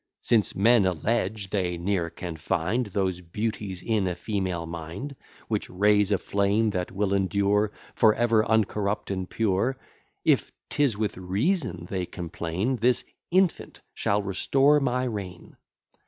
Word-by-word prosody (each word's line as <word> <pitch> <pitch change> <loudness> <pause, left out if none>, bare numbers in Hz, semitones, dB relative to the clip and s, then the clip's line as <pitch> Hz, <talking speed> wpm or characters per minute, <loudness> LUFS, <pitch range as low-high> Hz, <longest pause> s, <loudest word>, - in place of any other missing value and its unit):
Since 110 -3 +2
men 110 0 +5
allege, 100 +2 -1
they 90 -4 0
ne'er 85 -1 -1
can 85 0 -6
find 95 +9 -1
Those 95 -3 -1
beauties 95 0 -4
in 110 -4 +1
a 90 - -1
female 90 -2 -2
mind, 85 - -6 0.3
Which - - -2
raise 105 +2 +3
a 100 - +4
flame 100 +3 +1
that 90 -2 -2
will 100 +1 0
endure 100 +2 +2 0.2
For 110 -3 +4
ever 115 -2 +3
uncorrupt 105 -2 0
and 95 -1 -3
pure; 115 +4 0 0.5
If - - +3 0.2
'tis 140 -8 +2
with 105 -2 -2
reason 95 - -1
they 90 -2 -3
complain, 90 +7 -3
This 120 +2 +2 0.2
infant 185 0 +1
shall 100 0 0
restore 135 +9 +3
my 125 -2 0
reign. 100 -7 -6
100 Hz, 140 wpm, -26 LUFS, 90-110 Hz, 0.5 s, men